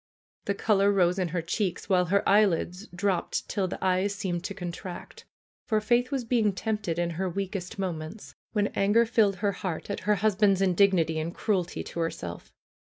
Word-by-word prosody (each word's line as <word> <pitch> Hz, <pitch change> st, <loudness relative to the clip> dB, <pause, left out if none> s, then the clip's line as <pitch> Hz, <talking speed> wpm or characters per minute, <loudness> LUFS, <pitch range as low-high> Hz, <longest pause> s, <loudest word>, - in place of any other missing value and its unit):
The 200 Hz, -, 0 dB
color 200 Hz, -1 st, +3 dB
rose 180 Hz, -1 st, +2 dB
in 185 Hz, -, +1 dB
her 170 Hz, 0 st, -2 dB
cheeks, 180 Hz, +1 st, -2 dB
while 180 Hz, -2 st, +3 dB
her 200 Hz, +4 st, +1 dB
eye 205 Hz, +2 st, +6 dB
lids 180 Hz, +1 st, -1 dB
dropped 185 Hz, +1 st, -1 dB
till 195 Hz, -3 st, -1 dB
the -, -, -5 dB
eyes 190 Hz, +2 st, +1 dB
seemed 175 Hz, -3 st, -3 dB
to 200 Hz, -, -4 dB
contract. 180 Hz, -1 st, -7 dB, 0.4 s
For 215 Hz, -2 st, +2 dB
Faith 240 Hz, +3 st, +2 dB
was 275 Hz, -3 st, -1 dB
being 225 Hz, -3 st, +2 dB
tempted 205 Hz, -4 st, -2 dB
in 175 Hz, 0 st, 0 dB
her 185 Hz, +3 st, -2 dB
weakest 190 Hz, 0 st, -4 dB
moments; 180 Hz, +1 st, -5 dB, 0.2 s
when 210 Hz, -2 st, +1 dB
anger 205 Hz, +4 st, +3 dB
filled 215 Hz, -3 st, +3 dB
her 200 Hz, +1 st, 0 dB
heart 185 Hz, 0 st, -4 dB
at -, -, -3 dB
her 210 Hz, -, +5 dB
husband's 200 Hz, -1 st, +3 dB
indignity 185 Hz, -4 st, +3 dB
and 165 Hz, +3 st, -4 dB
cruelty 185 Hz, -5 st, -1 dB
to -, -, -7 dB
herself. 90 Hz, -, -4 dB
195 Hz, 180 wpm, -27 LUFS, 175-205 Hz, 0.4 s, eye